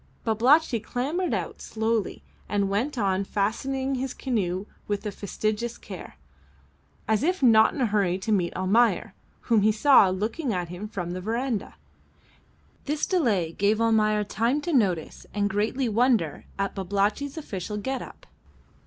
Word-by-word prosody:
Babalatchi 240 +4 +3
clambered 280 - -2
out - - -3
slowly 220 -1 -2 0.3
and 200 -1 0
went 250 +8 -1
on 195 -3 +1
fastening 260 +7 -1
his 260 0 -3
canoe 195 -7 -1 0.2
with 205 -1 -2
fastidious 215 +4 -3
care, - - -10 0.9
as 220 -1 +2
if 355 +1 0
not 220 -3 +6
in 285 - -3
a - - +4
hurry 200 -4 +1
to 195 +3 -3
meet 180 -5 +2
Almayer, 220 +6 +2 0.3
whom 230 -3 +2
he 215 +2 +4
saw 220 -2 +6
looking 220 - -2
at 175 -2 -3
him 180 +4 -6
from 180 -5 -5
the 185 +1 -4
verandah. 230 +2 -2 1.1
This 300 +1 -1
delay 215 - +1
gave 205 +5 +1
Almayer 215 -2 +3
time 230 +7 0
to 340 +2 -3
notice 185 - 0
and 205 -1 +1
greatly 220 +6 0
wonder 225 - +1
at 195 0 -1
Babalatchi's 205 - -1
official 210 - -5
get 265 +5 -3
up. - - -11
215 Hz, 145 wpm, -26 LUFS, 200-255 Hz, 1.1 s, not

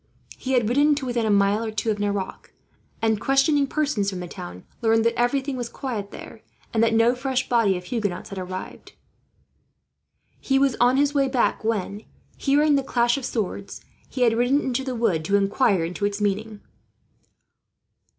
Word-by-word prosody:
He 265 - -4
had 240 -4 +3
ridden 290 +5 +3
to 285 -2 -4
within 240 -3 -1
a - - +1
mile 200 +2 +3
or 225 - -3
two 215 +1 -1
of 210 - -3
Nerac 200 -2 -3 0.5
and, 220 -2 +1
questioning 275 +1 +3
persons 275 -10 0
from 190 -2 -5
the 180 - -6
town, 175 - -9 0.2
learned 225 0 +3
that 230 - +3
everything 265 +3 0
was 240 -1 -4
quiet 220 -7 -5
there, - - -11 0.3
and 225 - +2
that 230 0 +3
no 230 +2 +4
fresh 260 0 -2
body 225 -6 +2
of 180 - -8
Huguenots 205 -2 -3
had 195 - -6
arrived. 185 0 -7 1.5
He 270 - +1
was 275 -2 +2
on 245 +2 +4
his 285 0 +2
way 275 -2 +2
back 255 -3 0
when, 210 -2 -2 0.3
hearing 295 +2 +2
the 275 - 0
clash 240 -2 +2
of 275 -3 -4
swords, 200 -3 -4 0.3
he 260 - -5
had 230 -2 +4
ridden 245 +4 +3
into 260 0 -2
the 260 -2 -4
wood 210 -9 +1
to 200 - +1
inquire 200 -2 +2
into 180 +4 -3
its 205 0 -2
meaning. 210 +1 -2
230 Hz, 180 wpm, -24 LUFS, 205-265 Hz, 1.5 s, no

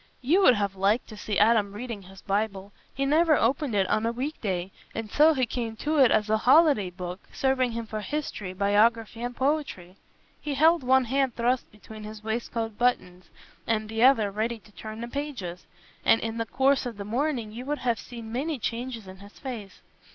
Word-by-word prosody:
You 335 +10 +4
would 255 -10 +7
have 200 -2 -1
liked 200 +5 +1
to 215 - -9
see 210 -1 -3
Adam 210 -2 +4
reading 230 -1 -6
his 190 0 -14
Bible. 200 -1 -2 0.2
He 275 - -2
never 310 +3 +4
opened 265 0 +1
it 195 -2 +2
on 215 - +1
a - - +1
weekday, 220 - -3 0.2
and 225 -2 -5
so 310 +1 +5
he 260 -2 +2
came 235 -2 -4
to 300 +6 -1
it 260 -3 +7
as 215 -1 +2
a 220 0 +2
holiday 265 - +5
book, 180 0 -7
serving 260 -2 +1
him 230 0 -4
for 215 -1 -5
history, 215 -8 -4
biography, 215 +4 +2
and 245 0 -4
poetry. 260 - -2 0.4
He 295 -1 -3
held 320 +4 +5
one 260 0 +3
hand 265 0 0
thrust 245 +2 0
between 215 +1 -12
his 215 0 -9
waistcoat 225 -1 -3
buttons, 185 -7 0 0.4
and 215 -1 0
the 225 0 -2
other 235 -6 +5
ready 225 +3 -2
to 210 -1 -20
turn 215 +2 -8
the 235 - -4
pages, 240 -11 -5 0.4
and 225 - +5
in 225 0 -4
the 230 - -2
course 270 +3 +2
of 230 -4 -7
the 200 - -6
morning 240 0 -1
you 235 +3 -7
would 295 +1 -1
have 235 -3 +1
seen 230 -2 -9
many 285 +6 -2
changes 235 -1 -4
in 185 0 -10
his 200 +2 -14
face. 225 -8 -8
230 Hz, 200 wpm, -27 LUFS, 210-260 Hz, 0.4 s, would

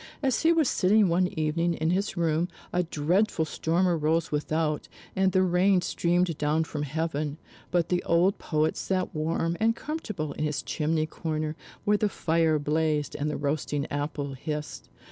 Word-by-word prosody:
As 265 -3 +2
he 330 - +5
was 325 -4 +3
sitting 200 0 +3
one 180 +2 +3
evening 165 +2 +1
in 160 +1 0
his 195 +1 -1
room, 165 0 +1 0.3
a 180 - +3
dreadful 170 +2 +1
storm 170 +4 0
arose 165 -1 +1
without, 150 +1 -1 0.3
and 190 0 +3
the 185 +1 +3
rain 185 +1 +3
streamed 175 -2 0
down 150 +2 +2
from 150 -1 -5
heaven; 150 0 -2 0.3
but 175 -2 +1
the 180 -1 +1
old 175 +4 +2
poet 155 -1 0
sat 185 -1 -2
warm 165 +2 -1
and 225 +1 +3
comfortable 215 - -4
in - - -4
his 150 -1 -1
chimney 155 0 0
corner, 155 -1 -3 0.3
where 210 0 +4
the 210 0 +1
fire 160 -3 +1
blazed 150 0 0
and 150 +1 -1
the 150 - -2
roasting 145 0 -1
apple 145 -1 -3
hissed. 150 +2 -5
160 Hz, 165 wpm, -27 LUFS, 150-180 Hz, 0.3 s, he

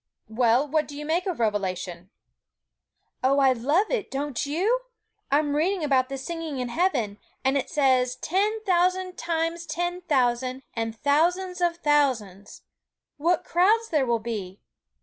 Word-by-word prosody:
Well, 240 +4 +2
what 310 +1 0
do 285 - -9
you 300 - -6
make 340 +5 0
of 360 -7 -3
Revelation?' 185 -4 -2 1.1
'Oh, 270 +2 +3
I 270 -2 +5
love 290 - +1
it, 470 -5 -1
don't 280 0 -3
you? 385 +12 +1 0.5
I'm 290 +1 +2
reading 350 +3 +1
about 265 -3 +2
the 270 - -4
singing 320 +1 -5
in 250 -1 -3
heaven; 240 - 0 0.3
and 265 +1 +3
it 275 - -1
says 260 -5 +2
"ten 415 +9 -1
thousand 365 -1 +1
times 335 0 -2
ten 350 +1 -2
thousand, 255 -4 0
and 225 -1 -3
thousands 355 +7 +1
of 345 -1 +1
thousands." 255 - 0 0.5
What 335 +3 +1
crowds 430 +6 +3
there 290 -5 +1
will 235 -1 +2
be! 210 -4 -5
290 Hz, 150 wpm, -25 LUFS, 250-350 Hz, 1.1 s, I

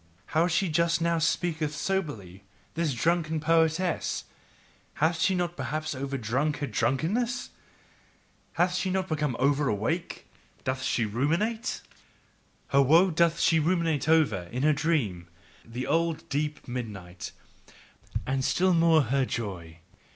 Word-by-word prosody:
How 160 +3 +4
she 180 +2 +1
just 170 +1 +2
now 170 0 +1
speaketh 155 -1 0
soberly, 145 - -3 0.3
this 165 -2 0
drunken 160 +4 +1
poetess! 165 +3 +1 0.7
hath 160 +2 +1
she 190 - +3
perhaps 165 -3 -2
overdrunk 135 +2 -1
her 145 - -2
drunkenness? 175 - -1 1.0
hath 175 +1 +2
she 185 +1 -1
become 155 -8 -1
overawake? 140 - 0 0.4
doth 130 0 -2
she 120 -2 0
ruminate? 170 - -1 0.9
Her 140 - +4
woe 165 +7 +5
doth 170 0 +2
she 165 - +4
ruminate 165 -2 +1
over, 140 - +3
in 125 +3 -2
a 155 0 +5
dream, 140 - -1 0.4
the 120 +2 -5
old, 165 +1 0
deep 150 +1 -2
midnight 105 -8 -6 0.9
and 130 0 -1
still 185 +7 +2
more 165 -2 +5
her 135 +2 +1
joy. 90 -9 -5
155 Hz, 120 wpm, -27 LUFS, 130-170 Hz, 1.0 s, woe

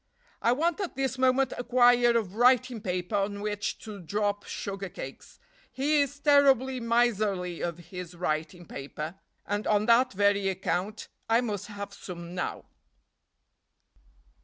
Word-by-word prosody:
"I 235 - +3
want 320 +8 +1
at 385 -7 -3
this 265 -1 -2
moment 260 0 +3
a - - -2
quire 245 -1 +5
of 200 -5 -2
writing 245 0 +3
paper 180 +1 -3
on 200 0 -1
which 205 0 -2
to 215 -2 -8
drop 205 +3 -2
sugar 195 -1 -5
cakes. 135 -5 -9 0.3
He 290 +3 +2
is 285 0 -2
terribly 270 -3 +4
miserly 215 -7 +1
of 170 -1 -2
his 175 +1 -9
writing 170 +1 -3
paper, 155 +5 -7 0.3
and 205 +1 -2
on 210 0 +3
that 235 +1 +4
very 200 0 +2
account 190 +2 -2 0.2
I 230 +2 +4
must 210 -5 -3
have 200 -1 -7
some 175 -3 -8
now. 180 - -4
210 Hz, 140 wpm, -28 LUFS, 185-250 Hz, 0.3 s, quire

